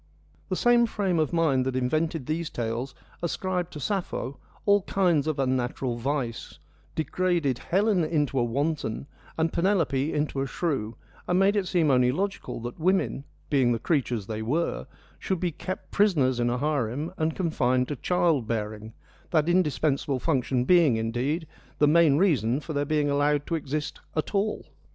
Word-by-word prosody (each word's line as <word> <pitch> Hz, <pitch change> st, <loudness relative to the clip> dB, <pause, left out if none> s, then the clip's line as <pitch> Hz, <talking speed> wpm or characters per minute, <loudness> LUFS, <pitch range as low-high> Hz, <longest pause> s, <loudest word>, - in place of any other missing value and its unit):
The 185 Hz, -, 0 dB
same 240 Hz, +3 st, +4 dB
frame 195 Hz, -6 st, 0 dB
of 155 Hz, -, +1 dB
mind 160 Hz, -6 st, +2 dB
that 130 Hz, 0 st, -2 dB
invented 155 Hz, +3 st, 0 dB
these 160 Hz, +2 st, -2 dB
tales 120 Hz, +3 st, -3 dB, 0.3 s
ascribed 180 Hz, +1 st, -2 dB
to 150 Hz, -, -6 dB
Sappho 145 Hz, -, -3 dB, 0.3 s
all 205 Hz, 0 st, +5 dB
kinds 175 Hz, -6 st, +1 dB
of 155 Hz, -2 st, -1 dB
unnatural 130 Hz, -1 st, -1 dB
vice, 125 Hz, -1 st, -3 dB, 0.4 s
degraded 160 Hz, -5 st, 0 dB
Helen 195 Hz, -1 st, +2 dB
into 150 Hz, -4 st, 0 dB
a -, -, +3 dB
wanton, 140 Hz, 0 st, -2 dB, 0.3 s
and 160 Hz, 0 st, 0 dB
Penelope 165 Hz, -6 st, +1 dB
into 145 Hz, -2 st, -1 dB
a 135 Hz, -, -1 dB
shrew, 130 Hz, -8 st, -2 dB, 0.3 s
and 180 Hz, -, +2 dB
made 195 Hz, +2 st, +4 dB
it 200 Hz, -3 st, 0 dB
seem 170 Hz, -5 st, +2 dB
only 125 Hz, -1 st, +4 dB
logical 195 Hz, +2 st, -3 dB
that 120 Hz, +5 st, -6 dB
women, 180 Hz, -5 st, +1 dB, 0.3 s
being 130 Hz, -4 st, +3 dB
the -, -, 0 dB
creatures 120 Hz, -, -1 dB
they 110 Hz, +1 st, -4 dB
were, 150 Hz, +10 st, -1 dB, 0.3 s
should 190 Hz, -3 st, -2 dB
be 175 Hz, -1 st, 0 dB
kept 185 Hz, +4 st, -6 dB
prisoners 145 Hz, -, +2 dB
in 120 Hz, 0 st, +2 dB
a 120 Hz, -, 0 dB
harem 145 Hz, +2 st, -1 dB
and 160 Hz, 0 st, 0 dB
confined 130 Hz, -8 st, +1 dB
to 145 Hz, -, -2 dB
child 160 Hz, -4 st, +1 dB
bearing 110 Hz, -1 st, -4 dB, 0.2 s
— -, -, -30 dB
that 155 Hz, -2 st, +2 dB
indispensable 150 Hz, -5 st, +1 dB
function 130 Hz, -4 st, 0 dB
being, 165 Hz, -9 st, +5 dB
indeed, 125 Hz, +9 st, -1 dB, 0.3 s
the 150 Hz, -, +4 dB
main 155 Hz, -1 st, +5 dB
reason 140 Hz, -, +2 dB
for 155 Hz, +1 st, -6 dB
their 145 Hz, 0 st, 0 dB
being 150 Hz, 0 st, +1 dB
allowed 145 Hz, 0 st, +1 dB
to -, -, -4 dB
exist 150 Hz, -1 st, -3 dB, 0.2 s
at 155 Hz, -, -2 dB
all. 210 Hz, +1 st, 0 dB
150 Hz, 165 wpm, -26 LUFS, 130-175 Hz, 0.4 s, all